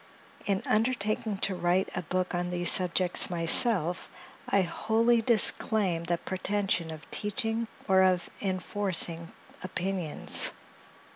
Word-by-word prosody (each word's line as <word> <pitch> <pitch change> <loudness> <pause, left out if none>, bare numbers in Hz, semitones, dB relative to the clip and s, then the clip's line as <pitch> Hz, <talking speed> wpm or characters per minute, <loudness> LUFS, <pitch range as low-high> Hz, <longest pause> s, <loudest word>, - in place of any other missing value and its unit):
In 195 -1 -2
undertaking 215 -2 -2
to 195 - -4
write 180 +1 -2
a 175 - -4
book 185 +2 -4
on 175 0 -4
these 175 0 +3
subjects 180 0 +2
myself, 175 +1 +4 0.4
I 200 -1 +1
wholly 225 +6 -1
disclaim 215 -6 +4
the 170 0 -2
pretension 190 -2 -4
of 160 -1 -11
teaching 225 +2 -4 0.2
or 190 0 +2
of 185 -1 0
enforcing 185 -3 -2 0.3
opinions. 185 -3 0
185 Hz, 115 wpm, -26 LUFS, 175-210 Hz, 0.4 s, myself